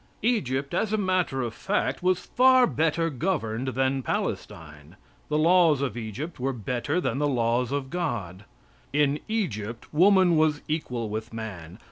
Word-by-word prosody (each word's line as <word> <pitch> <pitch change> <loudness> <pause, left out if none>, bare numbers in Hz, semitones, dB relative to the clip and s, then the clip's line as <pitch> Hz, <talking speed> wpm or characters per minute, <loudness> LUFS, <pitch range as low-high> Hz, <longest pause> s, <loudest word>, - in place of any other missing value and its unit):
Egypt, 140 - 0
as 220 - 0
a 215 - +1
matter 185 -9 0
of 115 -2 -4
fact, 200 - -1
was 180 0 +1
far 255 0 +5
better 165 - 0
governed 130 - -2
than 135 +1 +1
Palestine. 75 - -5 0.3
The 150 - +1
laws 165 -2 +4
of 135 -6 -2
Egypt 120 - -6
were 135 +2 -1
better 125 - -2
than 135 -7 -1
the 145 - +2
laws 120 -1 0
of 140 -1 -3
God. 105 - -3 0.5
In 145 +1 +2
Egypt 120 - -3
woman 185 0 +5
was 155 -1 +2
equal 125 -7 -2
with 110 +2 -5
man. 100 -6 -7
140 Hz, 150 wpm, -26 LUFS, 115-175 Hz, 0.5 s, far